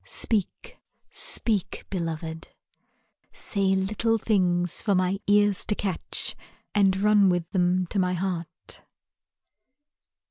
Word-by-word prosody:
Speak, 210 -5 -2 0.3
speak, 210 -6 -1
Beloved. 165 -3 -4 0.8
Say 195 -2 0
little 215 +4 +1
things 180 -5 +2
For 200 -3 +1
my 185 +1 +1
ears 205 -1 +4
to 210 - 0
catch 195 -5 -2 0.4
And 195 -2 +3
run 205 -1 +5
with 175 -2 0
them 180 0 +2
to 200 - 0
my 180 -1 +1
heart. 175 -3 -4
190 Hz, 105 wpm, -26 LUFS, 175-205 Hz, 0.8 s, run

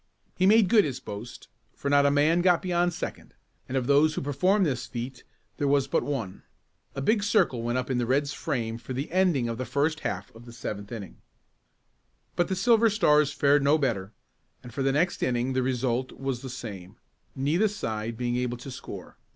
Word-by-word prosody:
He 185 - +3
made 215 -1 +6
good 210 +2 +5
his 130 -5 -3
boast, 110 0 -9 0.3
for - - -5
not 140 0 +4
a - - +5
man 150 +4 +3
got 180 0 +3
beyond 175 -1 +1
second, - - -7 0.3
and 130 - -1
of 130 - 0
those 145 +3 +4
who - - -2
performed 185 +9 +2
this 130 -5 -2
feat 125 +2 -6 0.3
there 145 - 0
was 140 -1 +3
but - - +1
one. 115 -10 -4 0.5
A 135 - -3
big 215 +6 +2
circle 200 - +2
went 120 +2 -1
up 130 0 -2
in 125 - +1
the 120 - -1
Red's 140 +3 +1
frame 115 -4 -3
for 120 +2 -7
the 135 +5 -4
ending 175 -9 +2
of 115 +1 -4
the - - -1
first 155 +5 0
half 100 - -4
of 115 +1 -14
the 120 - -11
seventh 105 -3 -6
inning. 105 -6 -7 1.2
But 175 - +1
the 190 - -1
Silver 225 +4 +4
Stars 150 -8 +3
fared 145 0 +3
no 140 +3 +4
better, 110 -9 -1 0.5
and 120 - -11
for 140 - -3
the 135 0 +2
next 165 +6 0
inning 125 +1 0
the 130 - +1
result 130 0 -1
was 135 -2 -4
the 135 - -7
same, 105 -6 -8 0.4
neither 150 +10 +2
side 115 - -4
being 120 0 -1
able 125 -1 -2
to 130 +3 -9
score. 130 - -9
135 Hz, 205 wpm, -27 LUFS, 120-155 Hz, 1.2 s, made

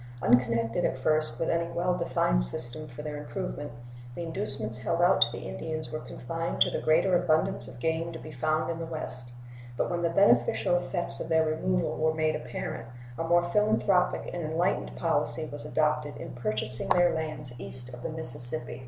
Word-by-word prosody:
Unconnected 115 -2 +1
at - - -1
first 145 -3 +1
with 165 - -1
any 170 0 -1
well 180 +1 -1
defined - - 0
system 120 - +3
for 150 +3 -10
their 150 -1 -6
improvement, 145 -2 -6 0.4
the 170 - -5
inducements 140 - -3
held 165 +6 -2
out 175 +2 +3
to 115 - +4
the 120 - -8
Indians 155 -1 -6
were 155 - -4
confined 165 +6 -6
to - - +3
the - - -3
greater 170 +4 +2
abundance 160 -2 +2
of 120 - -11
game 160 +4 -2
to 165 - -8
be 155 - -11
found 155 +4 -1
in 165 - -6
the 165 - -4
West; 125 -6 -6 0.4
but - - -1
when 175 -1 -2
the 170 - +1
beneficial 120 - +2
effects 175 0 -1
of - - -6
their 160 0 +2
removal 60 - -1
were 160 0 0
made 155 0 0
apparent 120 -1 -6 0.3
a - - -1
more 170 +1 +2
philanthropic 200 -1 +1
and 175 - -4
enlightened 155 - -2
policy - - -1
was - - -8
adopted - - -1
in - - -9
purchasing 120 +1 -1
their 175 -1 +3
lands 155 -6 +1
east 125 -1 -2
of 125 - -10
the - - -5
Mississippi. 140 -4 +7
155 Hz, 190 wpm, -27 LUFS, 120-170 Hz, 0.4 s, Mississippi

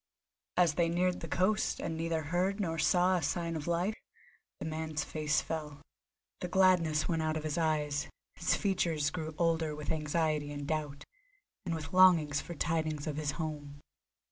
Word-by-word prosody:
As 175 -4 +4
they 170 +1 +2
neared 180 +1 +1
the - - -6
coast, 210 +4 +1
and 165 - -3
neither 165 0 -1
heard 180 +6 0
nor 165 -5 -1
saw 180 +3 +3
a - - -2
sign 165 +2 -1
of 155 0 -5
life, 175 +5 +1 0.7
the - - -5
man's 155 -1 -2
face 155 0 0
fell. 150 -3 -5 0.6
The 180 - -3
gladness 175 -4 +3
went 165 -2 0
out 155 0 0
of 155 - -5
his 155 -1 -2
eyes, 150 -3 0 0.3
his - - +1
features 170 -7 0
grew 160 -2 -5
older 165 -2 +1
with 150 -1 -4
anxiety 155 -1 0
and 145 -1 -5
doubt, 145 -2 -3 0.6
and 165 - 0
with 155 -1 -7
longing 180 -5 +6
for 170 +4 -3
tidings 155 -2 -1
of 150 -2 -3
his 150 -1 -1
home. 150 -3 -5
160 Hz, 170 wpm, -32 LUFS, 150-175 Hz, 0.7 s, longing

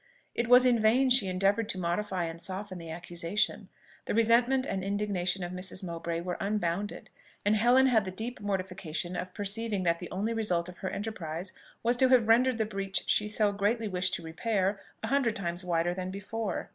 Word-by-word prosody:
It 235 - -1
was 250 +1 +7
in 245 -2 +4
vain 245 +5 +4
she 245 -6 +5
endeavoured 195 +4 +1
to 195 - -1
modify 185 +1 -1
and 165 0 -6
soften 190 +1 -4
the 165 -1 -9
accusation, 170 +4 -2 0.4
the - - -2
resentment 240 +4 +4
and 195 -5 -3
indignation 195 -2 -1
of 175 - -4
Mrs. 185 +1 -4
Mowbray 170 -1 -3
were 180 0 -3
unbounded; 200 -1 -2 0.3
and 205 +1 +4
Helen 245 +5 +5
had 235 -5 +4
the 190 - -4
deep 225 +6 -5
mortification 185 -3 -3
of 180 +1 -4
perceiving 205 0 -2
that 170 -1 +1
the 180 - -7
only 210 +5 -2
result 180 -7 0
of 180 -1 -10
her 190 - -3
enterprise 185 -4 -5 0.3
was 240 +1 +2
to 260 +1 +5
have 250 -4 +5
rendered 245 +2 +4
the 220 - +1
breach 195 -2 -3
she 210 - +2
so 210 -1 +2
greatly 210 +3 0
wished 185 -1 0
to 170 - -6
repair 195 +4 -1 0.2
a - - -1
hundred 270 -5 +2
times 175 -1 -3
wider 175 0 +1
than 185 0 -4
before. 205 +3 -4
195 Hz, 195 wpm, -29 LUFS, 180-225 Hz, 0.4 s, was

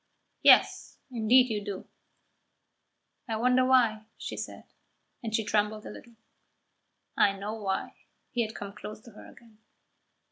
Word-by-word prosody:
"Yes, - - +5
indeed 245 +2 +4
you 210 -1 -2
do." 200 -2 -6 1.4
"I 225 - -2
wonder 250 +3 +3
why," 235 -4 +3
she - - -6
said, - - -7 0.6
and 220 -2 -3
she 220 - +1
trembled 210 0 0
a - - -7
little. 235 -1 -13 1.0
"I 195 - +4
know 205 +2 -5
why." 200 -3 -3 0.4
He 245 -4 0
had 220 0 -3
come 200 -1 -7
close 210 0 -9
to 235 - -15
her 210 - -13
again. 225 -2 -19
220 Hz, 140 wpm, -28 LUFS, 210-235 Hz, 1.4 s, Yes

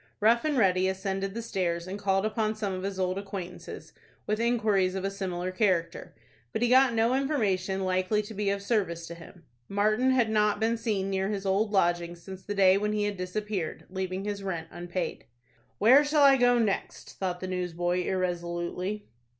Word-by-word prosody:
Rough 230 +3 +4
and 300 -3 +1
Ready 185 -4 +3
ascended 195 +1 -2
the 230 - -4
stairs, 170 -6 -2
and 190 +2 -6
called 195 0 +1
upon 215 0 0
some 205 -3 -3
of 185 - -4
his 195 0 -4
old 185 +1 0
acquaintances, 195 -3 -8 0.3
with 215 +1 -1
inquiries 215 -6 +2
of 190 0 -3
a 195 - -1
similar 185 -2 -3
character. 185 -4 -1 0.4
But 225 - -1
he 240 - +3
got 260 -1 +5
no 230 +2 +3
information 205 -9 0
likely 185 +3 +1
to 210 - -9
be 205 -1 -1
of 200 0 -2
service 185 -7 -1
to 170 - -7
him. 170 +1 -14 0.3
Martin 215 +5 +2
had 245 -4 +2
not 210 -1 +2
been 225 +1 +1
seen 205 -4 -2
near 190 0 0
his 200 -2 -3
old 195 +3 +1
lodgings 175 -3 +1
since 190 -1 -9
the 205 +2 -5
day 190 0 +5
when 210 +1 -1
he 210 -1 0
had 205 0 -1
disappeared, 185 -1 -4
leaving 190 0 -3
his 205 -1 -3
rent 170 -4 -4
unpaid. 175 0 -4 0.5
"Where 260 - +6
shall 295 0 +3
I 275 -1 +8
go 245 -1 +4
next?" 215 -4 -2
thought 180 -2 -2
the 185 - -5
newsboy, 180 -1 -1
irresolutely. 180 +2 -2
195 Hz, 190 wpm, -28 LUFS, 185-215 Hz, 0.5 s, I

